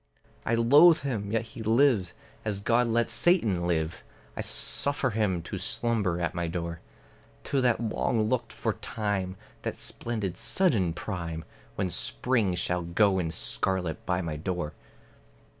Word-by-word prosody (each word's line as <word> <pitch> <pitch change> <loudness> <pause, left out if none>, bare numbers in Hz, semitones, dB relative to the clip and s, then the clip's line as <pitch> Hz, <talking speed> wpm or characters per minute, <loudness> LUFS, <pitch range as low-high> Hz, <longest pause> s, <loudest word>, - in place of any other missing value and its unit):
I 115 - +3
loathe 145 +9 +6
him, 110 -8 -3
yet 115 0 +1
he 115 - -10
lives; 110 -4 +3 0.3
as 105 -2 -2
God 115 +4 +2
lets 115 0 +1
Satan 110 - +2
live, 80 0 -1 0.3
I - - -3
suffer 140 -2 +2
him 100 -6 0
to - - -5
slumber 105 -7 0
at 85 -1 -1
my 85 -1 -2
door, 85 0 -4 0.6
Till 140 - 0
that 125 -3 +2
long 110 -1 0
looked 115 -1 -1
for - - -2
time, 100 -4 -3 0.3
that - - -3
splendid 110 -6 -4
sudden 110 - +1
prime, 85 -3 -5 0.3
When 95 -3 -1
Spring 115 -6 +1
shall 90 0 0
go 95 +3 +2
in 85 -3 -1
scarlet 90 0 -1
by 90 0 0
my 80 -2 -3
door. 85 -1 -3
100 Hz, 145 wpm, -28 LUFS, 90-115 Hz, 0.6 s, loathe